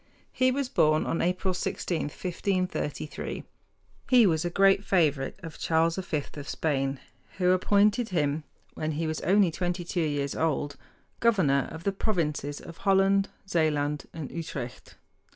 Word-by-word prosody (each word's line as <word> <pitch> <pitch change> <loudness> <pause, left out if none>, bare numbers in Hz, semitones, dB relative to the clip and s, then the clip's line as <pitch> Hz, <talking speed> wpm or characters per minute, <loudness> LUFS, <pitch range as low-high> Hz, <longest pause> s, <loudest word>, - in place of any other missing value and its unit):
He 255 0 +3
was 270 +1 0
born 155 - +3
on 165 - -1
April 185 +2 0
16, 175 -1 -2
1533. 180 -2 -3 0.7
He 245 -3 +7
was 160 -5 +2
a 175 - -1
great 195 +2 +4
favorite 155 -7 +1
of 165 -2 -8
Charles 165 +1 +2
V 160 -6 -2
of 145 -2 -8
Spain, 135 -3 -1 0.4
who 180 -1 +3
appointed 205 +5 +3
him, 150 -4 0 0.3
when 155 0 -3
he 160 +3 -2
was 155 0 -2
only 195 -2 +4
twenty 175 +1 -2
two 175 +1 -2
years 145 -3 -1
old, 145 -2 0 0.4
governor 180 -13 +3
of 160 +1 -8
the 200 - +1
provinces 150 -8 -1
of 165 - -11
Holland, 195 0 +3 0.2
Zealand, 150 -4 0
and 155 -4 -7
Utrecht. 145 -7 -6
165 Hz, 145 wpm, -28 LUFS, 150-195 Hz, 0.7 s, He